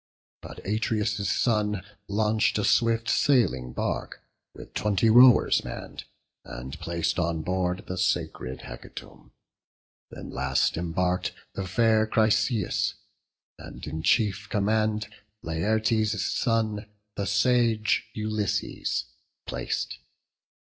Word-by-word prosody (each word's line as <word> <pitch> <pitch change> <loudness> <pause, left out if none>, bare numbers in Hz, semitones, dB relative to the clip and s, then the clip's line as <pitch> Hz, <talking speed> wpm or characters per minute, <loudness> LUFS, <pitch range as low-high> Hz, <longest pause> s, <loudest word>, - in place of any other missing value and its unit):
But - - -11
Atreus' 105 -1 0
son 105 -2 +1 0.2
launch'd 110 +1 +1
a 105 - 0
swift 115 0 +2
sailing 90 - +2
bark, - - -3 0.3
With - - -12
twenty 105 +1 +2
rowers 125 +1 +7
mann'd, - - -7 0.4
and 65 +5 -8
plac'd 85 +1 -1
on 85 -2 -1
board 90 +1 -1
The 90 0 -5
sacred 85 -7 -1
hecatomb; - - -11 0.8
then - - -9
last 65 0 +1
embark'd 90 +2 -1 0.2
The 95 -1 -4
fair 110 +2 +3
Chryseis, 110 +1 +1 0.6
and - - -9
in 80 +1 -4
chief 105 +2 +1
command 110 +1 +1 0.4
Laertes' 110 +5 0
son, 110 0 0 0.3
the 100 - -2
sage 115 +1 +2
Ulysses, 110 -1 -2 0.4
plac'd. - - -3
105 Hz, 100 wpm, -26 LUFS, 90-110 Hz, 0.8 s, rowers